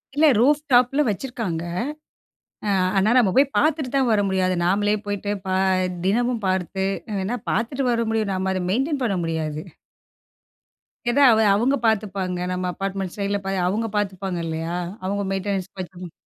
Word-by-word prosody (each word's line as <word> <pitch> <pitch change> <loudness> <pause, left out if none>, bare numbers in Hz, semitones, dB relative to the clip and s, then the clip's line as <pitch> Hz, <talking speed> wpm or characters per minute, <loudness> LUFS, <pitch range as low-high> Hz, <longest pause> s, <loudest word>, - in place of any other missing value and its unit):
இல்ல 310 - +4
ரூஃப் 290 +4 +4
டாப்பில 250 +4 +4
வச்சுருக்காங்க, 210 -7 -3 1.0
ஆ - - +1 0.3
ஆனா 200 +3 +3
நம்ம 215 -7 +4
போய் 275 +1 +4
பார்த்துட்டு 305 -3 +1
தான் 265 -3 +3
வர 215 - +3
முடியாது. 185 -1 +1
நாமளே 205 +3 +2
போய்ட்டு 205 0 -3 0.2
பா 185 - 0 0.5
தினமும் 235 +2 +1
பார்த்து, 190 +1 -1 0.3
எ - - -3
வேணா 200 +6 -2
பார்த்துட்டு 260 +4 -1
வர 235 0 +1
முடியும். 220 -3 0
நம்ம 190 0 -1
அத 185 - -2
மெயின்டெயின் 270 +6 0
பண்ண 200 -6 0
முடியாது. 155 -2 -2 1.5
எதா 280 +4 +4
அவ 220 - +4 0.2
அவுங்க 250 +7 +2
பாத்துப்பாங்க. 195 -4 -1
நம்ம 180 0 -2
அப்பார்ட்மெண்ட் 195 -1 -4
சைட்ல 200 0 0
பா 195 - -1 0.2
அவுங்க 215 +5 0
பாத்துப்பாங்க 195 -2 -2
இல்லையா? 165 +1 -3 0.3
அவங்க 200 +1 -1
மெயின்டெனன்ஸ் 195 -1 -2
பாத்துக்கும். 180 -1 -7
200 Hz, 150 wpm, -23 LUFS, 185-240 Hz, 1.5 s, இல்ல